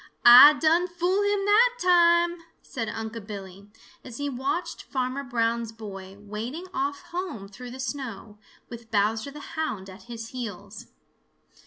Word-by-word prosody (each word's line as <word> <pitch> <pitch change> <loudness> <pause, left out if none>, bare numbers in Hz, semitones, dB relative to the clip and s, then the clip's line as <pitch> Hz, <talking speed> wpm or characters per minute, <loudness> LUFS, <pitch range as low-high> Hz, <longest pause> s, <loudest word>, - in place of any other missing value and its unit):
"Ah 265 +5 +10
done 330 +3 +3
fool 360 +3 0
him 405 -1 0
that 475 +4 +4
time," 345 -1 +4 0.2
said 225 -4 -5
Unc' 220 -1 -6
Billy, 200 -1 -9 0.3
as 240 -3 -9
he 285 0 -2
watched 270 +7 -3
Farmer 260 +1 -3
Brown's 235 -2 -1
boy 195 -3 -10
wading 220 - -6
off 375 +1 -2
home 345 - -5
through 245 +5 -10
the 255 +2 -10
snow, 235 -6 -6 0.3
with 235 -1 -11
Bowser 220 +4 0
the 295 +1 -10
Hound 215 -12 -4
at 190 +4 -14
his 230 -1 -7
heels. 210 -4 -8
245 Hz, 145 wpm, -26 LUFS, 215-340 Hz, 0.3 s, Ah